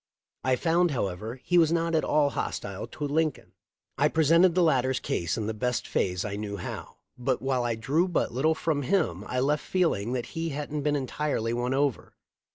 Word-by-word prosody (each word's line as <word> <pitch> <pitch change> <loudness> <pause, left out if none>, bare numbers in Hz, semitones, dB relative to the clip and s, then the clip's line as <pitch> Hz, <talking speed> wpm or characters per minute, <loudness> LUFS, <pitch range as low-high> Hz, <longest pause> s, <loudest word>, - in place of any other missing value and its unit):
I 130 0 +3
found, 170 +5 +2
however, 110 - -3
he 175 0 +3
was 165 -1 +4
not 165 0 +1
at 160 - +2
all 145 -2 +2
hostile - - -4
to 150 - -8
Lincoln. 155 0 -1 0.5
I 145 - +5
presented 165 +3 +4
the 180 - +4
latter's 130 -5 +2
case 85 -1 -2
in 110 - -2
the 110 - -2
best 125 +2 -2
phase 90 0 0
I 100 -1 -3
knew 105 -1 -4
how, 90 - -7 0.2
but 130 +1 0
while 130 -2 0
I 120 -1 0
drew 140 +11 +1
but 180 - 0
little 155 +6 +2
from 155 -3 0
him, 125 - 0
I 125 - -1
left 145 +3 +1
feeling 145 - 0
that 125 -2 -2
he 165 0 -2
hadn't 150 0 -3
been 150 +1 +1
entirely 135 -4 -1
won 125 +2 -1
over. 140 -3 -1
140 Hz, 195 wpm, -27 LUFS, 120-160 Hz, 0.5 s, I